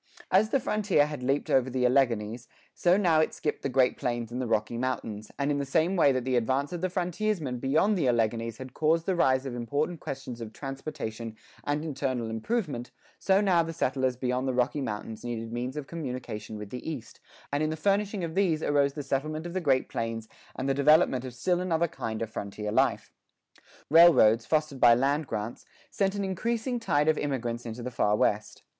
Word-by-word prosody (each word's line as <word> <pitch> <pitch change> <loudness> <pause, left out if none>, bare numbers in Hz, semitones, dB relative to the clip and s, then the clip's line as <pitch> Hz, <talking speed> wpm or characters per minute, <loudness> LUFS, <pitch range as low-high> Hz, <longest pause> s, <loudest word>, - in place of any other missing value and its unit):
[8:3] - - -18
As 215 +1 0
the 275 - +2
frontier 210 - +2
had 150 -3 -6
leaped 135 +3 0
over 130 -1 +3
the 125 0 0
Alleghanies, 120 -3 +1 0.3
so 175 +1 +3
now 170 -6 +3
it 155 - +1
skipped 150 - -3
the 140 - -2
Great 130 -1 +2
Plains 120 -3 -2
and 125 +2 -3
the 125 - -2
Rocky 110 0 0
Mountains; 115 -4 -3
and 140 +1 0
in 145 - 0
the - - -1
same 160 +7 +1
way 155 -6 +5
that 130 -2 -1
the 130 -1 +1
advance 130 +6 0
of 175 - -4
the 185 - 0
frontiersmen 180 - -2
beyond 155 - +2
the 165 -8 +1
Alleghanies 115 -1 0
had 130 -1 -9
caused 160 +2 +2
the 190 - +1
rise 130 -5 +2
of 135 - -4
important 145 +8 -2
questions 130 -4 -6
of 110 -1 -7
transportation 135 -5 -6 0.3
and 145 +2 -1
internal 130 -6 -2
improvement, 125 - -2 0.3
so 195 +1 +3
now 185 -4 +4
the 165 0 -4
settlers 130 -3 0
beyond 125 +1 -1
the 130 - -1
Rocky 125 +4 +1
Mountains 110 -2 -5
needed 115 -1 -4
means 125 +4 -3
of 150 - -4
communication 125 -9 -6
with 105 -1 -8
the 125 +5 -5
East, 145 -8 -7 0.3
and 145 - +1
in 155 - +1
the 155 - -3
furnishing 200 +2 0
of 165 -1 -3
these 175 -5 +1
arose 140 -1 +2
the 145 - -5
settlement 155 +4 -2
of 175 - -5
the 185 - -1
Great 135 -5 +2
Plains 115 -1 -4 0.3
and 130 - -3
the 135 - +2
development 140 -2 +4
of 125 -1 -7
still 180 +7 0
another 170 -2 +1
kind 110 -7 -4
of 110 - -5
frontier 105 0 -5
life. - - +1 0.7
Railroads, 150 -9 +6
fostered 150 -3 0
by 120 -1 +7
land 140 +4 +1
grants, 105 +3 -4 0.3
sent 195 0 0
an 200 - -2
increasing 230 +6 -1
tide 150 -9 +1
of 155 -1 +3
immigrants 120 -4 -3
into 115 +2 -6
the 125 - -4
Far 105 -3 +2
West. 105 0 0
135 Hz, 205 wpm, -28 LUFS, 120-160 Hz, 0.7 s, by